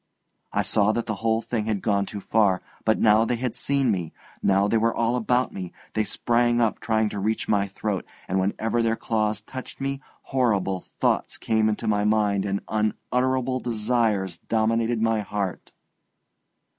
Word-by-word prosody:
I - - +1
saw 105 +1 +2
that 120 - -1
the 110 - -2
whole 115 0 +1
thing 110 -3 -2
had 105 -3 -1
gone 100 -2 +1
too 100 - -6
far. 100 -4 +2 0.2
But 110 - +3
now 110 0 +5
they 120 +1 0
had 120 -1 -3
seen 135 -1 +1
me, 85 -5 -2 0.3
now 100 +1 +3
they 115 - +2
were 115 +1 +1
all 115 +1 +1
about 125 +1 +1
me, 90 -2 -6 0.2
they 110 - +1
sprang 120 +2 +1
up 115 -3 +1
trying 110 -1 +1
to 100 - -5
reach 110 +3 -1
my 100 -1 +2
throat; 100 0 -3 0.2
and 95 +1 0
whenever 110 +4 0
their 115 0 +2
claws 110 -2 -1
touched 130 +4 -9
me, 135 0 -2 0.3
horrible 100 -8 +1
thoughts - - +1
came 110 -1 +1
into 105 - -2
my 105 -1 +2
mind 105 -2 +2
and 100 0 -1
unutterable 125 +4 0
desires 110 -5 0
dominated 115 +1 +1
my 115 -1 +2
heart. 100 -3 -4
110 Hz, 170 wpm, -25 LUFS, 105-115 Hz, 0.3 s, now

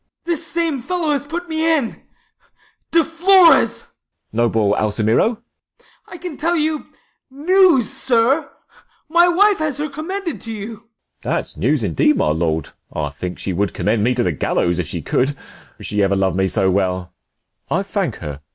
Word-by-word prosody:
This 340 -2 -2
same 325 -6 -1
fellow 335 +2 -1
has 285 -1 0
put 345 +3 -5
me 320 0 +2
in. 245 -6 -4 0.5
— - - -37
De 330 0 +4
Flores! 345 +1 +5
DeF. - - -28 0.4
Noble 110 -3 +2
Alsemero? 110 - +1 0.4
Ah. - - -29 0.3
I - - -7
can 345 -4 -7
tell 335 +3 0
you 310 -1 -1 0.4
90 285 +7 -5
News, 350 - +5
sir; 260 +5 +1 0.6
my 345 +2 +5
wife 395 +3 +4
has 305 -4 -1
her 300 +1 -2
commended 335 +3 -5
to 225 - -7
you. 215 +1 -6
De - - -20
F. - - -31 0.4
That's - - -2
news - - +1
indeed, 300 -1 +2
my - - +2
lord; 80 -2 -1 0.2
I 75 -2 -3
think 90 +5 -6
she 95 - -4
would 100 +3 -1
Commend 105 0 0
me 125 +2 +2
to 120 - +1
the 90 - +1
gallows 85 +3 0
if 85 - -2
she - - -5
could, 135 +3 0 0.4
She 105 0 -1
ever 100 0 +2
lov'd 95 -3 +1
me 95 0 +1
so 95 -1 +2
well; 95 -2 -1 0.6
I - - 0
thank - - -2
her. 70 -2 -6
245 Hz, 180 wpm, -19 LUFS, -, 0.6 s, Flores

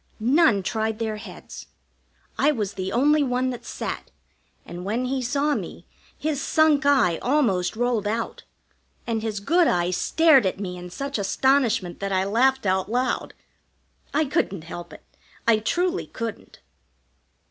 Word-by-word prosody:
None 240 - +3
tried 220 +2 -1
their 220 -1 -3
heads. 210 - -10 0.7
I 295 - +3
was 210 -8 -3
the 190 -1 -4
only 295 +6 +3
one 255 -1 0
that 245 - -7
sat, - - -5 0.6
and 175 +1 -8
when 225 +6 -1
he 260 +1 -1
saw 280 +4 0
me, - - -6 0.3
his 300 -3 -2
sunk 310 -1 +3
eye 220 -13 +3
almost 225 -10 +1
rolled 235 -3 0
out, 225 +2 -3 0.6
and 225 -2 -1
his 215 -2 -3
good 335 - +3
eye 175 0 +1
stared 275 - +4
at 185 - -3
me 185 -3 -4
in 180 0 -8
such 275 +6 -4
astonishment 230 -3 +1
that 195 0 -3
I 190 0 +2
laughed 250 +5 +2
out 190 +1 +1
loud. 250 +3 -1 0.8
I 310 +2 +2
couldn't 200 - -1
help 170 +1 -8
it, - - -13 0.4
I 230 -2 +6
truly 355 - -1
couldn't. 225 -2 -7
230 Hz, 150 wpm, -24 LUFS, 200-275 Hz, 0.8 s, I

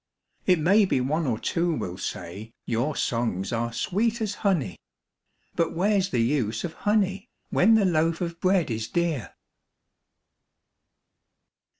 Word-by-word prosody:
It 180 -2 +5
may 195 +7 +4
be 160 - +1
one 150 +5 0
or 115 -4 0
two 170 +6 0
will 90 -9 -4
say 105 +7 -6
your 125 +6 -1
songs 115 -5 -1
are 115 0 -1
sweet 220 - 0
as 215 -2 -2
honey, 170 - 0 0.8
But 165 - 0
where's 195 +1 +2
the 120 - +1
use 115 -4 0
of 165 - -4
honey, 200 -2 0 0.2
when 220 +5 +5
the 215 -3 +4
loaf 165 -2 +1
of 170 -1 -4
bread 185 -7 +2
is 110 0 -2
dear? 165 - -2
165 Hz, 135 wpm, -26 LUFS, 115-190 Hz, 0.8 s, It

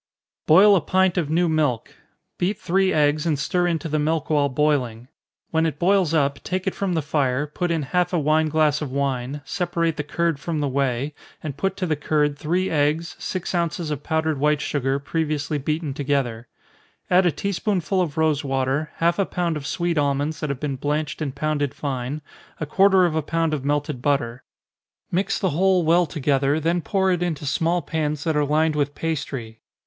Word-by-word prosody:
_ - - -71
Boil 200 +6 +7
a 180 - +3
pint 185 +4 +2
of 165 -5 0
new 170 +2 +2
milk 150 -7 0 0.5
beat 195 +4 0
three 190 +1 +2
eggs, 150 0 +2
and 155 -3 +1
stir 175 +5 0
into 165 -2 -1
the 155 0 0
milk 155 +1 -1
while 145 -2 +3
boiling. 130 -4 0 0.4
When 160 0 +2
it 150 - -4
boils 185 0 +3
up, 140 -3 +1
take 185 0 -2
it 190 - 0
from 195 -2 -2
the 160 -3 0
fire, 140 -2 0
put 175 +4 -3
in 165 -3 0
half 180 +5 0
a 180 - +1
wine 155 +1 +2
glass 155 -1 +2
of 145 -4 -4
wine, 135 0 -2
separate 170 -4 -1
the 150 - -2
curd 165 0 -1
from 160 +1 -3
the 145 - 0
whey, 135 +1 -1 0.3
and 150 -4 -4
put 190 +6 -2
to 185 - -1
the 160 -3 0
curd 150 0 +1
three 175 +6 -1
eggs, 155 +2 0
six 185 -1 -4
ounces 170 -2 -1
of 145 -2 -3
powdered 160 -1 -1
white 150 +1 +2
sugar, 135 -2 -1
previously 150 0 -2
beaten 155 +1 -2
together. 130 -5 -1 0.6
Add 180 0 +5
a - - +3
tea 200 +7 -3
spoonful 190 -1 0
of 160 -5 -3
rosewater, 140 -2 0
half 170 +3 +1
a 195 - +3
pound 175 -2 -1
of 145 -2 -5
sweet 170 -1 0
almonds 145 +2 0
that 150 - -3
have 140 -2 -3
been 140 -2 -3
blanched 150 +3 -2
and 140 -3 -3
pounded 145 -1 -1
fine, 140 +1 -4 0.4
a 155 - -2
quarter 190 +3 +4
of 170 - 0
a 160 - +1
pound 165 +1 -1
of 145 -3 -2
melted 145 -2 -1
butter. 130 -3 0 0.7
Mix 190 +2 0
the 190 - 0
whole 185 +3 +3
well 170 +2 +4
together, 145 -1 +1
then 170 +3 0
pour 190 +2 +1
it 175 -1 0
into 160 -5 -2
small 165 +4 0
pans 150 -1 -2
that 160 -2 0
are 150 - +3
lined 155 +2 +2
with 145 -1 -1
pastry. 135 -8 -4
155 Hz, 200 wpm, -23 LUFS, 145-170 Hz, 0.7 s, Boil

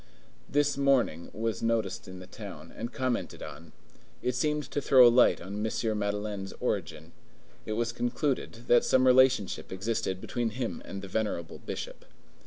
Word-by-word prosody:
This 145 0 +2
mourning 130 - +2
was 115 0 -2
noticed 115 0 -1
in 95 0 -8
the 90 - -9
town, 90 -7 -10
and 120 +2 -5
commented 130 -3 -2
on. - - -10 0.5
It 125 - +1
seemed 150 +4 0
to 145 - -1
throw 130 -3 +7
a 120 - +5
light 125 0 +5
on 100 +4 -5
M. 110 -1 -1
Madeleine's 100 -1 -3
origin. 80 +1 -3 0.6
It 110 - -1
was 115 +1 0
concluded 120 0 -2
that 120 - +5
some 130 0 +3
relationship 130 -5 +4
existed 100 0 -2
between 120 +4 -2
him 125 -3 -3
and 95 0 -7
the - - -6
venerable 95 -5 -2
Bishop. - - -7
115 Hz, 160 wpm, -29 LUFS, 100-125 Hz, 0.6 s, throw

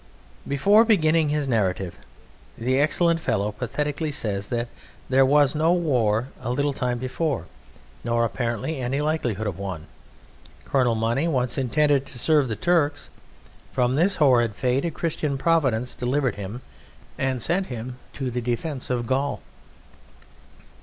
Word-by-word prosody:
Before 200 +11 +5
beginning 165 -8 +3
his 150 -1 0
narrative 95 -6 0 0.6
the 130 +3 +1
excellent 165 +3 +3
fellow 105 -9 -1
pathetically 150 +8 -3
says, 100 -6 -2
that 120 -1 0
as 120 - -6 0.4
there 135 +1 +5
was 145 -1 +4
no 160 +3 +3
war 125 -9 +1
a - - -4
little 140 +3 0
time 125 -2 -1
before, 135 +3 -2 0.6
nor 115 0 +1
apparently 120 +5 -2
any 130 +3 -1
likelihood 135 -9 -1
of 100 -3 -3
one, 95 -5 -5 0.8
"Colonel 125 -4 +2
Money 115 +8 0
once 130 -6 0
intended 140 +1 +2
to 130 - -5
serve 150 +2 +3
the 110 - -2
Turks"; 145 +1 +1 0.6
from 125 0 +1
this 180 +7 +2
horrid 120 -7 +3
fate 130 +6 0
a - - +1
Christian 155 -3 -2
Providence 130 -7 +1
delivered 130 +1 0
him, 105 +5 -7 0.6
and 130 -1 0
sent 180 - 0
him 125 +1 -6
to 130 -3 -3
the 125 +1 -2
defence 125 +4 -3
of 120 -2 -1
Gaul. 135 +4 -1
130 Hz, 145 wpm, -24 LUFS, 120-150 Hz, 0.8 s, Before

